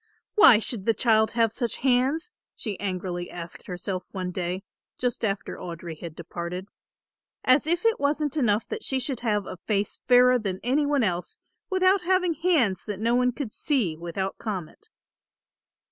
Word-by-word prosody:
"Why 420 - +8
should 220 -2 -2
the 225 - +4
child 220 -1 +3
have 225 -2 +4
such 235 -3 -2
hands?" 270 - +2 0.2
she 210 -5 -5
angrily 180 -2 -3
asked 170 -1 -9
herself 185 0 -4
one 185 -2 -4
day, 180 +1 -3 0.3
just 245 -2 -2
after 200 -2 -2
Audry 170 -1 -6
had 165 -3 -8
departed, 170 +2 -5 0.8
"as 260 +4 +4
if 345 +5 0
it 455 0 +3
wasn't 290 0 0
enough 225 -7 +1
that 445 -1 -4
she 265 - 0
should 260 -1 -3
have 210 -4 0
a - - -7
face 200 +2 -2
fairer 250 0 +6
than 190 -4 -3
any 280 +5 +2
one 285 -3 +2
else 180 -3 -2 0.3
without 375 0 +3
having 365 -1 +2
hands 310 - +2
that 205 -3 -4
no 230 +2 +1
one 250 0 +3
could 245 -3 -5
see 235 - +1
without 175 +4 -4
comment." 210 - -6
225 Hz, 165 wpm, -26 LUFS, 185-280 Hz, 0.8 s, Why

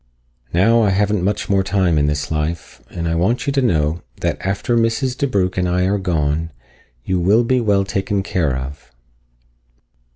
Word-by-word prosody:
Now 115 +7 +4
I 105 - +3
haven't 100 0 +1
much 105 +2 -1
more 95 -1 +2
time 95 -4 +1
in 75 - +2
this 75 0 -2
life, 80 +2 -3
and 85 -1 -4
I 80 - 0
want 95 - 0
you 140 - 0
to 135 - +2
know 80 - +1 0.2
that - - -1
after 100 +5 -1
Mrs. 115 +3 +1
DeBrugh 100 -10 0
and 90 -1 0
I 90 +1 +1
are 100 +2 +1
gone, 80 -3 -1 0.5
you 95 -1 -1
will 100 +7 +3
be 125 +1 +1
well 100 -3 +2
taken 95 +1 -1
care 80 -9 0
of." 65 +1 -8
95 Hz, 175 wpm, -19 LUFS, 80-105 Hz, 0.5 s, Now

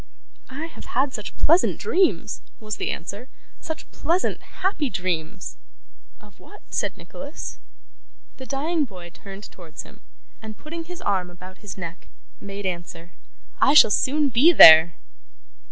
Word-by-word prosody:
'I 280 +5 -6
have 330 - -12
had 265 0 +1
such 210 - -7
pleasant 335 +4 +3
dreams,' 385 -4 0 0.2
was 215 -1 -5
the - - -3
answer. 200 +8 -6 0.3
'Such 320 0 -7
pleasant, 345 +3 -1 0.2
happy 320 -8 0
dreams!' 180 -2 -4 0.6
'Of 210 -3 -20
what?' 415 - -16
said - - -2
Nicholas. 285 +3 -9 0.8
The 260 - -10
dying 305 +4 -1
boy 180 -7 -12
turned 195 +2 -11
towards 170 -3 -11
him, - - -18 0.4
and, 215 -1 -9
putting 330 +2 -8
his 355 +1 -10
arm 185 -3 -1
about 180 +2 -13
his 210 -2 -9
neck, 175 0 -8 0.3
made 200 0 -8
answer, 175 -1 -6 0.5
'I 280 - +4
shall 255 - +8
soon 285 +6 +2
be 265 +8 +5
there! 165 - +9
215 Hz, 140 wpm, -23 LUFS, 180-300 Hz, 0.8 s, there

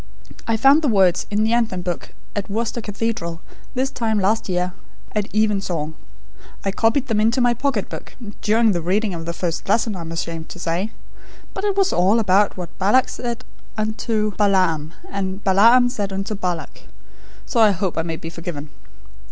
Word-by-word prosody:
I 225 -1 +2
found 275 +7 +6
the 305 - +1
words 190 -6 +3
in 210 +1 +1
the 220 +1 +2
Anthem 220 -7 0
book 175 -1 -4 0.2
at 205 -1 -3
Worcester 230 +3 -2
Cathedral, 210 -5 -3 0.4
this 265 +2 0
time 220 -3 0
last 205 +2 +1
year, 180 0 0 0.4
at 210 -1 -1
even 210 -2 +2
song. 160 -5 -3 0.7
I 195 - +1
copied 225 +7 +2
them 220 -5 +1
into 230 +4 +3
my 245 -1 +4
pocket 240 -4 -1
book, - - -9 0.3
during 220 +1 +3
the 175 -3 -1
reading 195 +4 0
of 165 -1 -6
the - - 0
first 170 +1 -3
lesson, 220 0 +2
I 180 - -6
am 165 0 -6
ashamed 165 -1 -4
to - - -8
say; 175 +5 -2 0.6
but 385 - -5
it 400 -1 0
was 390 -1 +3
all 190 +5 +4
about 205 -2 +3
what 175 -2 -7
Balak 210 +7 +4
said 240 -2 -4 0.3
unto 215 0 0
Balaam, 185 -6 +2
and 195 0 -4
Balaam 230 +6 +6
said 205 -5 -3
unto 195 +2 -3
Balak, 180 -5 -4 0.6
so 240 - -1
I 220 -2 +7
hope 190 -2 -1
I 165 - +1
may 165 0 -3
be 165 0 -7
forgiven! 155 -3 -6
205 Hz, 185 wpm, -21 LUFS, 180-225 Hz, 0.7 s, I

